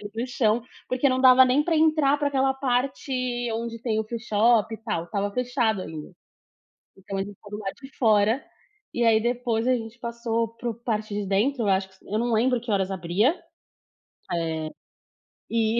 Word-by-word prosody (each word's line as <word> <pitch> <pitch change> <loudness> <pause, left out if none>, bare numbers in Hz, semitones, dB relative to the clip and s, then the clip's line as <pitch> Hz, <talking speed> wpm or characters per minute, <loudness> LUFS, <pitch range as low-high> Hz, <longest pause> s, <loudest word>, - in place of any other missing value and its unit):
para 205 - -7
o - - -2
chão, 235 -2 +1 0.3
porque 255 +2 +2
não 255 0 +1
dava 260 0 +8
nem 255 +3 +3
para 335 -1 +1
entrar 310 -2 +3
para 290 -1 +1
aquela 270 -1 +2
parte 265 +1 -1 0.4
onde 230 0 -4
tem 225 -3 -1
o - - -3
freeshop 225 0 +2
e - - -6
tal. 215 -7 -3
Estava 200 +2 -2
fechado 240 -3 0
ainda, 155 0 -8 0.8
então 195 +1 -6
a - - 0
gente 200 +1 -8
ficou 205 +1 -16
do 210 - -5
lado 195 -2 -4
de 270 0 -12
fora. 220 +2 +3 0.5
E 240 - +1
aí, 225 -1 +5
depois 240 -1 -1
a 255 - +4
gente 225 -1 -5
passou 235 -1 -2
para 245 - -4
o - - -5
parte 215 -2 -3
de 205 -1 -2
dentro, 230 +7 +1
eu - - 0
acho. 190 0 +2 0.2
Eu 210 - -1
não 240 +1 0
lembro 240 +2 +2
que 235 -1 -7
horas 195 -1 +1
abria, 195 - +1 0.9
eh, 160 -2 -2 0.8
e 225 0 +1
230 Hz, 190 wpm, -25 LUFS, 205-250 Hz, 0.9 s, dava